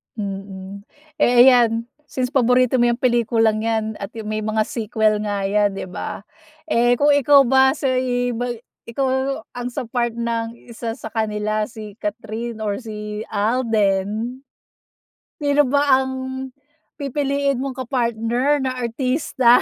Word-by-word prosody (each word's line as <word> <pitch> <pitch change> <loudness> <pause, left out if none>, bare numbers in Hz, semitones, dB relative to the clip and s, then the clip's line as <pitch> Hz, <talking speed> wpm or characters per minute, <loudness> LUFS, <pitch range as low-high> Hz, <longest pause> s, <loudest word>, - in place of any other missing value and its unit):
Mhm, 195 -1 -6 0.3
eh 245 -3 +6
ayan. 235 -3 +5 0.2
Since 255 -3 -2
paborito 250 -1 +3
mo 240 - +4
'yang 240 +1 0
pelikulang 230 -3 +2
yan 220 -1 -1
at 200 +3 -7
may 215 0 -3
mga 215 0 0
sequel 215 -1 0
nga 205 -1 -2
yan 205 0 +1
'di 185 -1 -6
ba? 190 - -5 0.5
Eh 240 -2 +3
kung 290 +4 +3
ikaw 285 0 +6
ba 265 +1 +4
sa 270 -3 0
iba 245 -1 -1 0.4
ikaw 265 +3 -1
ang 245 0 -5
sa 250 +2 -4
part 235 0 -2
ng 230 -1 -2 0.2
isa 230 0 -4
sa 220 - -8
kanila 215 -1 -1
si 215 -2 -10
Kathryn 220 +2 -4
or 205 -1 -2
si 210 -2 -6
Alden? 215 +1 0 1.0
Sino 290 -1 +3
ba 280 -1 +4
ang 265 - -3 0.9
pipiliin 280 -1 -1
mong 270 -1 -4
ka-partner 240 +3 +1
na 260 - -1
artista? 250 0 +2
235 Hz, 135 wpm, -21 LUFS, 215-255 Hz, 1.0 s, eh